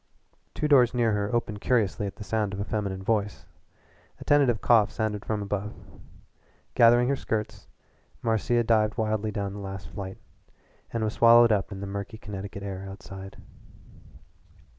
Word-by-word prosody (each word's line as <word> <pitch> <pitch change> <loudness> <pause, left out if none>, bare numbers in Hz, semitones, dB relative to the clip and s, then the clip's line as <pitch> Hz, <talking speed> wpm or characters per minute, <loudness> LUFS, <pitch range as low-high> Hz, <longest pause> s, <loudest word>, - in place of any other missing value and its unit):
Two 150 - 0
doors 125 -4 +5
near 120 -2 +2
her 105 -1 -1
opened 110 -3 -2
curiously 105 -4 +1
at 100 - -7
the 105 - -9
sound 105 -2 -1
of - - -7
a - - -1
feminine 100 -2 -3
voice. 105 -1 -1 0.7
A - - -8
tentative 135 -6 +3
cough 115 -4 +4
sounded 110 -2 -2
from 105 -2 -2
above. 105 +1 -4 1.0
Gathering 120 - +5
her 140 - +2
skirts, 110 -5 -4 0.6
Marcia 120 +2 +1
dived 110 -1 +2
wildly 110 -1 -1
down 100 -2 -3
the 105 - -7
last 95 -5 -7
flight, 95 +1 -7 0.7
and 115 -1 -2
was 110 0 -1
swallowed 115 0 +6
up 105 -1 0
in 95 -1 -7
the - - -4
murky 100 +2 -6
Connecticut 100 -2 -7
air 95 -1 -5
outside. 95 0 -10
105 Hz, 160 wpm, -27 LUFS, 100-115 Hz, 1.0 s, swallowed